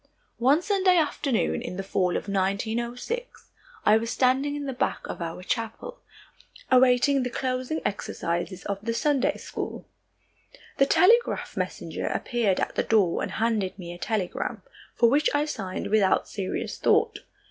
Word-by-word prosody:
One 275 Hz, +8 st, +4 dB
Sunday 375 Hz, -3 st, +3 dB
afternoon 280 Hz, -7 st, 0 dB
in 235 Hz, -7 st, -6 dB
the 195 Hz, -, -3 dB
fall 185 Hz, -2 st, 0 dB
of -, -, -6 dB
1906, 230 Hz, -, -2 dB, 0.3 s
I 215 Hz, -, +6 dB
was 230 Hz, +1 st, -3 dB
standing 265 Hz, +4 st, +2 dB
in 290 Hz, -1 st, -4 dB
the 270 Hz, -, -3 dB
back 245 Hz, -, -2 dB
of -, -, -6 dB
our 165 Hz, +2 st, -5 dB
chapel, 230 Hz, -, -4 dB, 0.7 s
awaiting 260 Hz, +2 st, +5 dB
the 250 Hz, -, -1 dB
closing 255 Hz, +5 st, -2 dB
exercises 180 Hz, -2 st, -3 dB
of 200 Hz, -1 st, -2 dB
the 230 Hz, +1 st, -2 dB
Sunday 280 Hz, +1 st, +1 dB
school. -, -, -6 dB, 0.9 s
The 275 Hz, -, +5 dB
telegraph 460 Hz, +10 st, +3 dB
messenger -, -, -3 dB
appeared 230 Hz, -6 st, 0 dB
at -, -, -1 dB
the -, -, +1 dB
door 200 Hz, -6 st, +2 dB
and -, -, -3 dB
handed 220 Hz, -5 st, 0 dB
me 175 Hz, -2 st, -7 dB
a 175 Hz, -, -11 dB
telegram, 205 Hz, -5 st, -2 dB, 0.3 s
for 235 Hz, -, +5 dB
which 285 Hz, +6 st, +3 dB
I 290 Hz, +1 st, +2 dB
signed 195 Hz, -8 st, -4 dB
without 210 Hz, -3 st, +3 dB
serious 195 Hz, -3 st, -4 dB
thought. -, -, +2 dB
235 Hz, 150 wpm, -26 LUFS, 195-275 Hz, 0.9 s, I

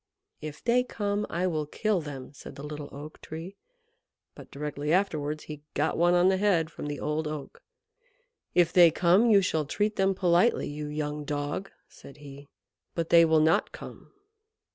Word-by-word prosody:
"If 150 Hz, -1 st, -8 dB
they 245 Hz, +1 st, +3 dB
come, 205 Hz, -3 st, -2 dB
I 175 Hz, +2 st, -1 dB
will 155 Hz, -4 st, -1 dB
kill 210 Hz, +3 st, 0 dB
them," 140 Hz, -3 st, -8 dB
said -, -, -11 dB
the 140 Hz, -, -9 dB
Little 150 Hz, -1 st, -7 dB
Oak 150 Hz, +2 st, -10 dB
Tree, 165 Hz, +5 st, -8 dB, 0.8 s
but -, -, -13 dB
directly 150 Hz, +1 st, -4 dB
afterwards 155 Hz, -5 st, 0 dB
he 150 Hz, -1 st, -9 dB
got -, -, 0 dB
one 175 Hz, +1 st, +3 dB
on 175 Hz, +1 st, +4 dB
the 190 Hz, 0 st, +3 dB
head 180 Hz, -5 st, +1 dB
from 150 Hz, -, -7 dB
the 145 Hz, 0 st, -4 dB
Old 155 Hz, +1 st, -2 dB
Oak. 150 Hz, -3 st, -7 dB, 0.9 s
"If 175 Hz, -2 st, +3 dB
they 175 Hz, -2 st, +8 dB
come, 180 Hz, +8 st, +3 dB
you 200 Hz, -3 st, +5 dB
shall 160 Hz, -4 st, 0 dB
treat 210 Hz, +8 st, -1 dB
them 195 Hz, 0 st, +2 dB
politely, 180 Hz, +4 st, +2 dB
you 150 Hz, +1 st, -5 dB
young 150 Hz, 0 st, -4 dB
dog," 145 Hz, +6 st, -3 dB, 0.2 s
said 140 Hz, -, -15 dB
he. 140 Hz, -1 st, -12 dB, 0.5 s
"But 165 Hz, -1 st, -2 dB
they 170 Hz, 0 st, +7 dB
will 160 Hz, -1 st, +4 dB
not 160 Hz, +2 st, +2 dB
come." -, -, -11 dB
160 Hz, 175 wpm, -28 LUFS, 150-185 Hz, 0.9 s, they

